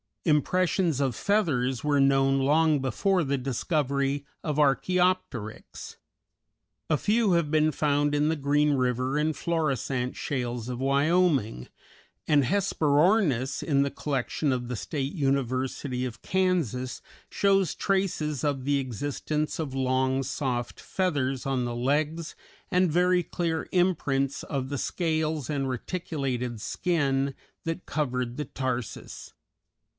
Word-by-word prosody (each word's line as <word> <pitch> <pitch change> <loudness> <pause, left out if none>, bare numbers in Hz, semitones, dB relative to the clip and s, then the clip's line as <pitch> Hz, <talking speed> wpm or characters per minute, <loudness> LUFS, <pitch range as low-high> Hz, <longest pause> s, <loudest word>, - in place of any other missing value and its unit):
Impressions 170 0 +2
of 130 -4 0
feathers 135 - +1
were 145 -1 +2
known 135 0 +4
long 150 +2 +3
before 170 - +1
the 140 -1 0
discovery 140 +1 -1 0.2
of 150 -2 -2
Archæopteryx; 155 - 0 0.9
a 155 - +3
few 215 - +2
have 170 -3 +2
been 155 0 +3
found 145 -1 +1
in 145 +1 +2
the 160 - +1
Green 145 0 +2
River 130 +1 0
and 155 +1 +1
Florissant 135 -6 -1
shales 125 -3 -3
of 125 -1 -4
Wyoming, 140 - +2 0.6
and 150 -3 +4
a - - 0
Hesperornis 155 - +2
in 140 -3 +2
the 140 - +1
collection 140 +1 -1
of 125 -1 -2
the 125 - -3
State 135 +4 -3
University 130 -3 -1
of 120 -3 -7
Kansas 165 - 0 0.3
shows 195 -4 +2
traces 170 -8 -1
of 140 -3 0
the 140 +1 +2
existence 145 +4 -2
of 150 -5 -3
long, 130 0 +1
soft 125 -3 -3
feathers 140 -9 -1
on 130 -2 0
the 120 0 -3
legs 150 +6 -1 0.4
and 180 -2 +3
very 180 +2 +3
clear 165 0 -2
imprints 145 -7 +1
of 135 -2 -3
the 140 -2 -3
scales 160 -5 -1
and 140 -3 -1
reticulated 130 -5 -3
skin 140 - 0 0.3
that 165 +2 -3
covered 125 -4 -2
the 150 - -2
tarsus. 125 - -5
145 Hz, 125 wpm, -27 LUFS, 130-160 Hz, 0.9 s, known